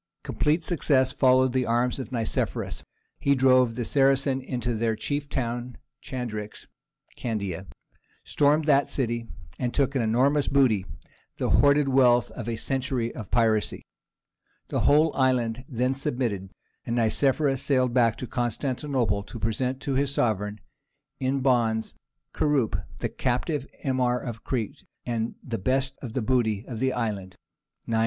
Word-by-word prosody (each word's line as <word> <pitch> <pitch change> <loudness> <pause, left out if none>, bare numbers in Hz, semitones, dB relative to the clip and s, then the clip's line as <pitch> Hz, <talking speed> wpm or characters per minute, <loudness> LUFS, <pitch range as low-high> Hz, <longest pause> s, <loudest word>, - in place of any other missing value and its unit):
Complete 155 +3 0
success 135 -6 +2
followed 130 -1 +3
the 130 -1 +1
arms 120 +3 +1
of 130 - -6
Nicephorus. 115 -3 -2 0.4
He 140 0 +3
drove 130 -3 +4
the 120 -1 -2
Saracens 135 0 +2
into 125 -2 -2
their 110 0 0
chief 145 +5 -3
town 120 -2 -3 0.2
Chandax 110 -5 -6 0.5
(Candia), 100 -5 -4 0.6
stormed 150 +2 +2
that 140 -2 +3
city, 120 -3 0 0.3
and 125 -1 -1
took 140 -1 +2
an 135 - +1
enormous 130 +6 +2
booty—the 110 - -1
hoarded 145 0 +4
wealth 125 -2 +4
of 120 -2 -6
a 115 - -1
century 125 0 -2
of 110 -6 -8
piracy. 110 -3 +1 0.9
The - - -1
whole 155 +2 +4
island 125 -2 +1
then 125 +1 0
submitted, 120 -9 -2 0.3
and 115 - -2
Nicephorus 135 +4 +2
sailed 130 -3 +2
back 115 -3 +3
to - - -5
Constantinople 120 -2 -1
to 100 - -9
present 125 +5 -1
to 140 - -2
his 140 +1 +1
sovereign, 105 -5 0 0.6
in 135 +1 0
bonds, 115 -4 +1 0.4
Kurup 145 -6 0
the - - -2
captive 135 +3 -1 0.2
Emir 130 -2 +1
of 115 -2 -6
Crete, 115 -6 -3 0.2
and 115 -2 -1
all - - -12
the 115 -3 -4
best 135 +6 0
of 120 -5 -7
the 130 - -1
booty 110 -4 +1
of 115 -4 -6
the 130 +1 +1
island 105 -7 -3 0.5
[961 115 - -4
A. 110 - +2
125 Hz, 145 wpm, -26 LUFS, 115-135 Hz, 0.9 s, drove